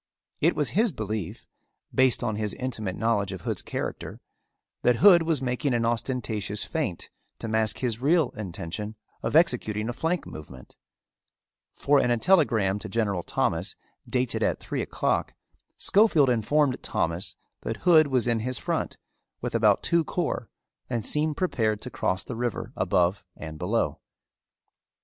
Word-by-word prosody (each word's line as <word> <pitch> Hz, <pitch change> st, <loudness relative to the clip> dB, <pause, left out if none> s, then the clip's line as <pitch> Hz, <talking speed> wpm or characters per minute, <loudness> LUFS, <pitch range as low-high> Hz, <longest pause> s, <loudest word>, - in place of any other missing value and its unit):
It 165 Hz, +3 st, +3 dB
was 150 Hz, -2 st, 0 dB
his 220 Hz, +3 st, +2 dB
belief, 110 Hz, -, -5 dB, 0.5 s
based 130 Hz, -2 st, +4 dB
on 110 Hz, -3 st, -1 dB
his 105 Hz, -1 st, -2 dB
intimate 110 Hz, -7 st, -3 dB
knowledge 105 Hz, -4 st, 0 dB
of 95 Hz, -2 st, -6 dB
Hood's -, -, -2 dB
character, -, -, -5 dB, 0.6 s
that 125 Hz, -, +4 dB
Hood 180 Hz, -, +7 dB
was 160 Hz, -5 st, 0 dB
making 125 Hz, +1 st, 0 dB
an 115 Hz, -1 st, +1 dB
ostentatious 115 Hz, -3 st, -2 dB
feint 140 Hz, -, -3 dB, 0.3 s
to -, -, -6 dB
mask 110 Hz, 0 st, +1 dB
his 120 Hz, -2 st, -2 dB
real 155 Hz, 0 st, +3 dB
intention 105 Hz, 0 st, -6 dB, 0.3 s
of -, -, -2 dB
executing 110 Hz, -9 st, +2 dB
a -, -, -2 dB
flank 160 Hz, +7 st, -1 dB
movement, 70 Hz, -5 st, -11 dB, 1.0 s
for 145 Hz, 0 st, +3 dB
in 125 Hz, -, +2 dB
a 120 Hz, -, +3 dB
telegram 115 Hz, -, +3 dB
to 110 Hz, -, -8 dB
General 100 Hz, -4 st, 0 dB
Thomas, -, -, -1 dB, 0.3 s
dated 125 Hz, -1 st, 0 dB
at -, -, +1 dB
three -, -, -3 dB
o'clock, -, -, -1 dB, 0.4 s
Schofield 170 Hz, -, +4 dB
informed 130 Hz, +4 st, +1 dB
Thomas 85 Hz, +2 st, -2 dB, 0.3 s
that 110 Hz, 0 st, -4 dB
Hood 160 Hz, -4 st, +7 dB
was 130 Hz, -3 st, +1 dB
in 115 Hz, -1 st, +2 dB
his 125 Hz, +2 st, -2 dB
front -, -, -2 dB, 0.4 s
with -, -, -4 dB
about -, -, +3 dB
two 170 Hz, -1 st, +3 dB
corps 160 Hz, -9 st, -2 dB, 0.4 s
and 120 Hz, -4 st, -2 dB
seemed 150 Hz, 0 st, +2 dB
prepared 110 Hz, -, 0 dB
to 125 Hz, -, -6 dB
cross 95 Hz, +1 st, -1 dB
the 125 Hz, -, -6 dB
river 120 Hz, -1 st, -3 dB
above 90 Hz, +3 st, +1 dB
and 80 Hz, -1 st, -8 dB
below. 90 Hz, -5 st, 0 dB
120 Hz, 150 wpm, -26 LUFS, 105-145 Hz, 1.0 s, Hood